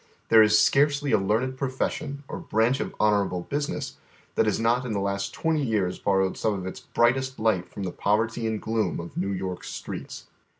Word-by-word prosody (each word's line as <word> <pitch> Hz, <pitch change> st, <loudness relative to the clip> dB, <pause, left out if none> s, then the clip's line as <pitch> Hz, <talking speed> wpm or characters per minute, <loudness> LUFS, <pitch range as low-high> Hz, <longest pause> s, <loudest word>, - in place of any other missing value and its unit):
There 110 Hz, -1 st, +8 dB
is 105 Hz, 0 st, +6 dB
scarcely 145 Hz, +2 st, +3 dB
a -, -, +4 dB
leai'ned 115 Hz, +7 st, 0 dB
profession, 140 Hz, +2 st, -3 dB
or -, -, -5 dB
branch 115 Hz, +5 st, +1 dB
of -, -, -4 dB
honorable 100 Hz, -4 st, +2 dB
business, 145 Hz, +9 st, -3 dB, 0.4 s
that 110 Hz, -, +2 dB
has 105 Hz, -, +1 dB
not 115 Hz, +3 st, +2 dB
in 120 Hz, -3 st, -3 dB
the 100 Hz, -, 0 dB
last 100 Hz, 0 st, -2 dB
twenty 160 Hz, -2 st, 0 dB
years 100 Hz, -7 st, 0 dB
borrowed 95 Hz, -1 st, +1 dB
some 110 Hz, -2 st, +1 dB
of 95 Hz, -2 st, -5 dB
its 95 Hz, -, -6 dB
brightest 130 Hz, +2 st, +1 dB
light 110 Hz, -5 st, +1 dB
from 100 Hz, -, -7 dB
the 90 Hz, -, -3 dB
poverty 115 Hz, +4 st, 0 dB
and 110 Hz, -1 st, -1 dB
gloom 110 Hz, -4 st, -1 dB
of 85 Hz, 0 st, -8 dB
New 95 Hz, +2 st, -1 dB
York's 95 Hz, -2 st, -4 dB
streets. -, -, -7 dB
110 Hz, 195 wpm, -26 LUFS, 100-130 Hz, 0.4 s, There